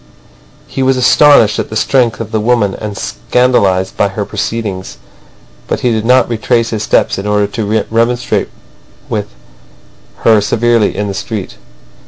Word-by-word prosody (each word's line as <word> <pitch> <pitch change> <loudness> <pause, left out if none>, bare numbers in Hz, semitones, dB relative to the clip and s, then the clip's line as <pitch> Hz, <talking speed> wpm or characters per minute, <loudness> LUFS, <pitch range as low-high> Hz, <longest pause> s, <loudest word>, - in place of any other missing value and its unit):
He 135 - -5
was 130 0 +2
astonished 125 -3 +4
at - - -3
the 110 - -6
strength 115 0 +1
of 115 -2 -6
the 110 - 0
woman 110 -3 +1
and 105 -1 -6
scandalised 95 - 0
by 100 - +2
her 100 +1 -4
proceedings. 105 -2 -4 0.7
But - - -2
he 125 - +1
did 110 -1 -1
not 125 +2 +4
retrace 115 0 0
his 110 -2 -2
steps 105 - +1
in 100 - -5
order 105 0 +2
to 105 +1 -2
remonstrate 120 +2 0 0.6
with - - -2 1.0
her 110 -2 +5
severely 115 +2 +1
in 105 0 -1
the 100 - -3
street. 100 +1 -5
110 Hz, 155 wpm, -13 LUFS, 105-120 Hz, 1.0 s, her